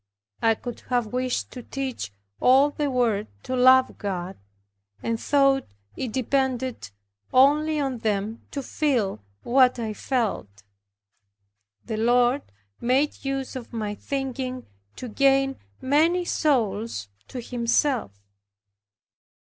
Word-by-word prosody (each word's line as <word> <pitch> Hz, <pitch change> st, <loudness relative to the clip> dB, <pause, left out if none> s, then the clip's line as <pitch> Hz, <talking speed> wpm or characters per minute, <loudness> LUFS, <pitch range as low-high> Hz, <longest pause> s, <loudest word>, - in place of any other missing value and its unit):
I 225 Hz, 0 st, +4 dB
could 240 Hz, +1 st, -7 dB
have 245 Hz, -3 st, 0 dB
wished 255 Hz, 0 st, -1 dB
to 250 Hz, -, -8 dB
teach 260 Hz, -, -5 dB, 0.3 s
all 270 Hz, +3 st, +5 dB
the 290 Hz, -1 st, -1 dB
world 235 Hz, -5 st, +1 dB, 0.2 s
to 255 Hz, -, -3 dB
love 255 Hz, +1 st, +5 dB
God; 190 Hz, -3 st, -4 dB, 0.7 s
and 230 Hz, -1 st, -1 dB
thought 275 Hz, 0 st, +3 dB, 0.3 s
it 250 Hz, -, -4 dB
depended 260 Hz, -, -1 dB, 0.4 s
only 300 Hz, +4 st, +4 dB
on 270 Hz, -4 st, -2 dB
them 215 Hz, +1 st, -2 dB
to 280 Hz, -, -4 dB
feel 240 Hz, -, 0 dB, 0.2 s
what 255 Hz, 0 st, +4 dB
I 225 Hz, -2 st, -3 dB
felt. 205 Hz, -, -2 dB, 1.2 s
The 220 Hz, -, -3 dB
Lord 245 Hz, +4 st, +3 dB, 0.4 s
made 265 Hz, +5 st, +1 dB
use 270 Hz, -1 st, -3 dB
of 250 Hz, -2 st, -8 dB
my 215 Hz, -2 st, -2 dB
thinking 260 Hz, +1 st, -4 dB, 0.3 s
to 255 Hz, -, -7 dB
gain 270 Hz, +3 st, +2 dB, 0.2 s
many 325 Hz, +6 st, +3 dB
souls 225 Hz, -, 0 dB, 0.2 s
to 255 Hz, -, -6 dB
Himself. 240 Hz, -, 0 dB
255 Hz, 115 wpm, -25 LUFS, 225-270 Hz, 1.2 s, all